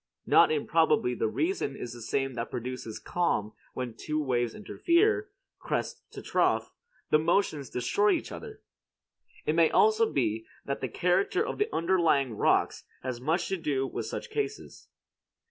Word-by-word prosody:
Not -, -, +6 dB
improbably 450 Hz, 0 st, +2 dB
the 445 Hz, -, 0 dB
reason 325 Hz, -, -1 dB
is 120 Hz, -, -6 dB
the 120 Hz, -, -10 dB
same 135 Hz, +4 st, -1 dB
that 115 Hz, -1 st, -4 dB
produces 125 Hz, -2 st, -5 dB
calm 110 Hz, -12 st, -1 dB, 0.2 s
when 125 Hz, -3 st, -4 dB
two 155 Hz, 0 st, -3 dB
waves 120 Hz, -5 st, 0 dB
interfere, 400 Hz, -, +1 dB, 0.3 s
crest -, -, -3 dB
to -, -, -8 dB
trough; -, -, +1 dB, 0.4 s
the 150 Hz, -, +6 dB
motions 160 Hz, -, +1 dB
destroy 200 Hz, +12 st, +2 dB
each -, -, -3 dB
other. 440 Hz, -2 st, -9 dB, 0.8 s
It 155 Hz, -, +1 dB
may 165 Hz, 0 st, +5 dB
be -, -, -5 dB
also 440 Hz, +1 st, +4 dB, 0.5 s
that 140 Hz, -, -3 dB
the 130 Hz, -, -2 dB
character 185 Hz, -, +1 dB
of -, -, -5 dB
the 420 Hz, +2 st, +1 dB
underlying 165 Hz, -8 st, +2 dB
rocks -, -, +2 dB, 0.2 s
has 125 Hz, -2 st, -4 dB
much 165 Hz, +6 st, 0 dB
to 190 Hz, -, 0 dB
do 140 Hz, -5 st, -1 dB
with -, -, -4 dB
such 480 Hz, -, -6 dB
cases. 425 Hz, -1 st, -4 dB
165 Hz, 155 wpm, -29 LUFS, -, 0.8 s, Not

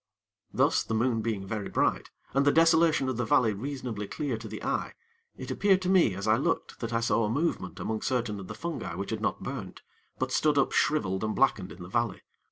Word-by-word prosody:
Thus, -, -, +3 dB
the 110 Hz, -, -3 dB
moon 115 Hz, 0 st, +1 dB
being 105 Hz, -3 st, -2 dB
very 105 Hz, 0 st, -4 dB
bright, -, -, 0 dB, 0.2 s
and 135 Hz, +2 st, +3 dB
the 145 Hz, -, +5 dB
desolation 165 Hz, -3 st, +4 dB
of 130 Hz, -3 st, -2 dB
the 120 Hz, -, 0 dB
valley 110 Hz, 0 st, +3 dB
reasonably 120 Hz, -2 st, -5 dB
clear 140 Hz, 0 st, -2 dB
to 110 Hz, 0 st, -7 dB
the -, -, -7 dB
eye, -, -, -2 dB, 0.4 s
it -, -, -6 dB
appeared 195 Hz, -2 st, +3 dB
to 180 Hz, -, 0 dB
me, 175 Hz, -, +4 dB
as 100 Hz, -, -4 dB
I -, -, +5 dB
looked -, -, -1 dB
that 115 Hz, -, -4 dB
I 115 Hz, 0 st, +1 dB
saw 115 Hz, 0 st, +2 dB
a 105 Hz, -, 0 dB
movement 135 Hz, -, -1 dB
among 110 Hz, -1 st, -2 dB
certain 120 Hz, -5 st, -1 dB
of 95 Hz, -, -8 dB
the -, -, -7 dB
fungi 155 Hz, -, -4 dB
which 100 Hz, +3 st, -4 dB
had 110 Hz, -1 st, -3 dB
not -, -, -1 dB
burnt, 115 Hz, -9 st, -6 dB, 0.3 s
but -, -, -2 dB
stood 150 Hz, -1 st, +2 dB
up 140 Hz, -, +3 dB
shriveled 95 Hz, -11 st, +1 dB
and 110 Hz, 0 st, -1 dB
blackened 105 Hz, -8 st, +2 dB
in 90 Hz, -, -10 dB
the -, -, -8 dB
valley. 115 Hz, 0 st, -1 dB
115 Hz, 225 wpm, -28 LUFS, 105-140 Hz, 0.4 s, the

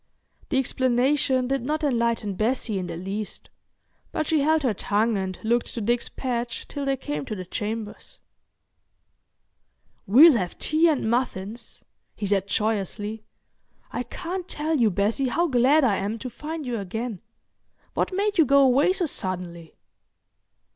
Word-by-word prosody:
The 265 Hz, -, +1 dB
explanation 260 Hz, 0 st, +2 dB
did 270 Hz, 0 st, 0 dB
not 305 Hz, +5 st, -2 dB
enlighten 235 Hz, -6 st, 0 dB
Bessie 220 Hz, 0 st, -1 dB
in 180 Hz, -, -4 dB
the 165 Hz, -, -5 dB
least, 195 Hz, +4 st, -6 dB, 0.6 s
but 310 Hz, -, -1 dB
she 315 Hz, 0 st, +2 dB
held 310 Hz, +1 st, +2 dB
her 245 Hz, -5 st, +2 dB
tongue 210 Hz, +3 st, +1 dB
and 190 Hz, -2 st, -3 dB
looked 235 Hz, +2 st, 0 dB
to -, -, -2 dB
Dick's 235 Hz, +3 st, 0 dB
path 240 Hz, -2 st, -3 dB
till 285 Hz, -1 st, -5 dB
they 275 Hz, 0 st, +1 dB
came 145 Hz, -, -4 dB
to 215 Hz, -, -4 dB
the 185 Hz, -2 st, -6 dB
chambers. 210 Hz, +3 st, -5 dB, 1.9 s
"We'll 270 Hz, -, +8 dB
have 180 Hz, -4 st, -3 dB
tea 315 Hz, +2 st, +3 dB
and 295 Hz, -8 st, +1 dB
muffins," 230 Hz, -2 st, -3 dB, 0.3 s
he 205 Hz, -, -4 dB
said 195 Hz, -1 st, +1 dB
joyously. 215 Hz, +1 st, -2 dB, 0.7 s
"I -, -, -2 dB
can't 360 Hz, +1 st, -5 dB
tell 310 Hz, 0 st, -1 dB
you, 230 Hz, -3 st, +4 dB
Bessie, 210 Hz, +8 st, 0 dB
how 335 Hz, +8 st, +1 dB
glad 275 Hz, +3 st, +4 dB
I 210 Hz, -7 st, +3 dB
am 205 Hz, +3 st, -2 dB
to 255 Hz, +2 st, -7 dB
find 310 Hz, +2 st, -6 dB
you 240 Hz, -3 st, -2 dB
again. 220 Hz, +1 st, -4 dB, 0.7 s
What -, -, 0 dB
made 400 Hz, 0 st, 0 dB
you 320 Hz, -, +7 dB
go 280 Hz, +1 st, +6 dB
away 275 Hz, +7 st, +4 dB
so 370 Hz, -, 0 dB
suddenly?" 180 Hz, -, -5 dB
240 Hz, 155 wpm, -25 LUFS, 205-280 Hz, 1.9 s, We'll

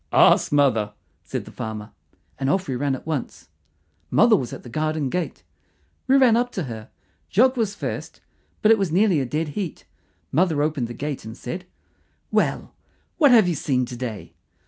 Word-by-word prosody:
"Ask -, -, +5 dB
mother," 120 Hz, -8 st, +2 dB, 0.3 s
said -, -, -5 dB
the -, -, -11 dB
farmer, 110 Hz, -1 st, -6 dB, 0.5 s
and 135 Hz, 0 st, 0 dB
off 190 Hz, +5 st, +1 dB
we 130 Hz, -, -2 dB
ran 135 Hz, +1 st, 0 dB
at -, -, -10 dB
once. 155 Hz, -5 st, -4 dB, 0.6 s
Mother 230 Hz, -1 st, +5 dB
was 125 Hz, -, -2 dB
at -, -, -8 dB
the -, -, -11 dB
garden 155 Hz, 0 st, -1 dB
gate. 180 Hz, -2 st, -3 dB, 0.6 s
We 265 Hz, +1 st, +5 dB
ran 255 Hz, -4 st, +6 dB
up 245 Hz, +1 st, +1 dB
to 185 Hz, -, -2 dB
her. 110 Hz, -5 st, -7 dB, 0.4 s
Jock 255 Hz, +6 st, +4 dB
was 215 Hz, -4 st, -1 dB
first, -, -, -5 dB, 0.4 s
but 215 Hz, -, +6 dB
it 225 Hz, -, +5 dB
was 195 Hz, -5 st, 0 dB
nearly 185 Hz, -2 st, +3 dB
a 130 Hz, -, -1 dB
dead 150 Hz, +4 st, -2 dB
heat. 175 Hz, +2 st, -5 dB, 0.5 s
Mother 160 Hz, -1 st, +2 dB
opened 150 Hz, -6 st, -1 dB
the 120 Hz, -, -8 dB
gate 145 Hz, +2 st, -4 dB
and 110 Hz, +1 st, -9 dB
said, 180 Hz, +9 st, -6 dB, 0.7 s
"Well, -, -, 0 dB, 0.5 s
what 295 Hz, -4 st, +7 dB
have 225 Hz, -7 st, +6 dB
you 175 Hz, -, +1 dB
seen 130 Hz, -4 st, 0 dB
to 125 Hz, 0 st, -8 dB
day?" 120 Hz, -4 st, -6 dB
150 Hz, 185 wpm, -23 LUFS, 125-195 Hz, 0.7 s, what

